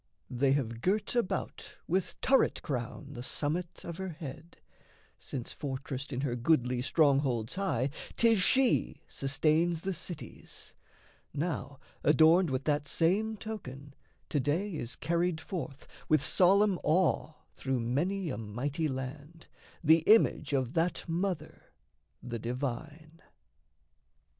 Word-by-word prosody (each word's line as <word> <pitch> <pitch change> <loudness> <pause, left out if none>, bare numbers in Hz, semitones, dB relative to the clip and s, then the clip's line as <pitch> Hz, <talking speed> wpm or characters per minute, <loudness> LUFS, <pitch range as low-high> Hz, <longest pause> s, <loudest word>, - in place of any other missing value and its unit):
They 135 +2 +2
have 115 -5 -2
girt 200 - 0
about 195 -6 -2
With 185 +2 -1
turret 270 0 +3
crown 135 0 -4
the 120 - -6
summit 160 +7 -3
of 170 -1 -6
her 190 0 -4
head, 160 0 -9 0.6
Since, 125 -3 -6
fortressed 135 0 -5
in 130 -1 -2
her 130 -4 -1
goodly 125 -1 +2
strongholds 135 -5 +2
high, 175 -9 0 0.2
'Tis 225 -4 +4
she 260 +5 +2
sustains 155 +4 +1
the 195 +2 -2
cities; 155 -7 -9 0.6
now, 150 -3 -3 0.2
adorned 160 +3 +5
With 130 0 -1
that 145 0 0
same 210 +9 +1
token, 145 -11 -7 0.4
to 145 - +1
day 160 +10 0
is 125 -6 -4
carried 170 0 0
forth, 160 -6 -6 0.2
With 155 -2 +3
solemn 195 +3 +4
awe 160 -1 +2 0.2
through 130 -1 -1
many 160 +10 -1
a 115 - -4
mighty 135 +9 -2
land, 140 +4 -6 0.4
The 160 +1 +6
image 210 -9 +4
of 130 -2 0
that 170 +2 0
mother, 170 -2 -3 0.5
the 120 -1 -4
divine. 145 +7 -5
155 Hz, 125 wpm, -31 LUFS, 135-175 Hz, 0.6 s, The